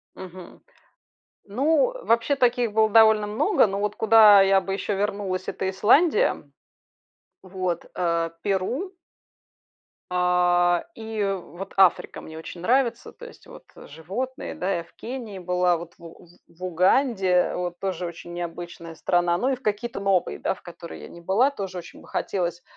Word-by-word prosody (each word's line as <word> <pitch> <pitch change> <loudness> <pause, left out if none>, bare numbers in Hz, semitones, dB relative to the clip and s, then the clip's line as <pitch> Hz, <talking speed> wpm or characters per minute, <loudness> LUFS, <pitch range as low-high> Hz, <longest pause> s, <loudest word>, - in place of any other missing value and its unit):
Мгм. 185 -1 -11 0.8
Ну, 310 - +1
вообще, 230 +5 +2
таких 245 -3 +1
было 220 0 +3
довольно 220 -1 +5
много, 230 - +2
но 195 0 -3
вот 210 0 -2
куда 215 -2 +7
я 195 0 +4
бы 195 - -5
ещё 200 0 -2
вернулась- 200 -2 -3
это 190 - -3
Исландия, 305 - +2 0.9
вот, 185 -2 -4
э, 170 -2 0
Перу. 245 - -2 1.2
А, 175 -1 +2
и 220 -1 -4 0.2
вот 175 +4 -10
Африка 190 -2 +3
мне 160 - -11
очень 170 +2 -9
нравится. 250 +3 0
То 485 - -12
есть 475 - -16
вот - - -13
животные, 195 - -6
да. 190 +2 -1
Я 170 - -6
в - - -25
Кении 230 -5 -7
была, 180 -1 +1
вот 170 0 -10
в 170 - -16
У 165 +1 -13 0.2
в 170 +2 -12
Уганде 185 - +2
вот- 175 -1 -4
тоже 185 -2 -3
очень 170 0 -9
необычная 170 -1 -7
страна. 175 0 +1
Ну 255 +7 0
и 265 - 0
в 250 - -21
какие-то 210 +1 -3
новые, 185 - 0
да, - - -1
в - - -20
которые 80 - -10
я - - -9
не 170 - -13
была, 200 +10 +2
тоже 195 -7 -6
очень 170 - -11
бы - - -17
хотелось. 175 -2 -3
190 Hz, 160 wpm, -24 LUFS, 175-225 Hz, 1.2 s, куда